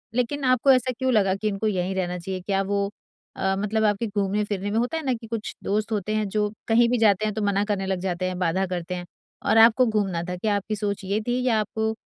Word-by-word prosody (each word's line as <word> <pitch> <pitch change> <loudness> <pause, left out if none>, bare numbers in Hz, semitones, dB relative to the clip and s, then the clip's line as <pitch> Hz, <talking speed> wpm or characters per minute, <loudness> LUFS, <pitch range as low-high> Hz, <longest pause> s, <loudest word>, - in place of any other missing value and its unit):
लेकिन 255 +3 -1
आपको 255 +1 +4
ऐसा 255 -1 +3
क्यों 260 0 +1
लगा 195 -4 +3
कि 215 +2 -3
इनको 210 +1 -1
यहीं 185 -2 -1
रहना 180 -1 -2
चाहिए। 185 +1 -5
क्या 195 +1 0
वो 200 0 -1 0.5
अ, 190 0 0
मतलब 215 +2 0
आपके 210 +2 +1
घूमने-फिरने 205 0 -1
में 215 - 0
होता 250 +7 -1
है 320 - -4
ना 260 - +2
कि 230 -1 -7
कुछ 225 -1 -5
दोस्त 210 +2 -1
होते 215 0 -1
हैं 215 -1 0
जो 210 +1 0 0.2
कहीं 235 +1 +4
भी 245 - +2
जाते 215 -2 +3
हैं 215 - -1
तो 215 - -3
मना 200 0 +2
करने 205 -2 -1
लग 190 -1 -1
जाते 185 -1 -2
हैं, 185 -1 -4
बाधा 185 +2 +1
करते 180 0 -4
हैं 175 0 -6 0.4
और - - +4
आपको 230 +3 +7
घूमना 200 -7 0
था। 180 - -2
क्या 205 +2 0
आपकी 205 +2 -2
सोच 205 -1 -3
ये 200 +3 0
थी 245 +1 +1
या 225 -3 +3
आपको 220 +1 -1
205 Hz, 250 wpm, -24 LUFS, 190-225 Hz, 0.5 s, आपको